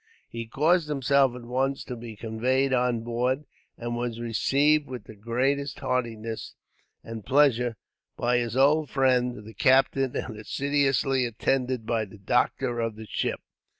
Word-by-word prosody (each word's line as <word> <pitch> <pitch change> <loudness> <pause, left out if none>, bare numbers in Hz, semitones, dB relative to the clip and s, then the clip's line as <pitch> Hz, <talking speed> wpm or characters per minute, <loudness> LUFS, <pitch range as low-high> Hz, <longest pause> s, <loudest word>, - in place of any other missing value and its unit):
He 115 -1 -6
caused 155 +7 +2
himself 140 -2 +3
at 125 - -9
once 135 +3 -1
to 125 - -6
be 115 -1 -8
conveyed 125 +5 0
on 125 -2 +1
board, 125 +5 -1 0.3
and 120 0 -4
was 120 -1 -3
received 140 +6 +2
with 125 -4 -7
the 110 - -12
greatest 130 +6 -1
heartiness 115 -3 -3 0.5
and 115 -2 -7
pleasure, 125 -4 +3 0.4
by 120 +1 +2
his 120 0 -2
old 145 +2 +4
friend, 125 -4 +1
the 110 - -10
captain; 135 0 +3
and 110 -3 -5
assiduously 135 +1 +1
attended 125 +1 -1
by 115 -1 0
the 100 +1 -14
doctor 120 +4 0
of 115 -2 -1
the 110 0 -9
ship. - - -2
125 Hz, 150 wpm, -26 LUFS, 115-135 Hz, 0.5 s, old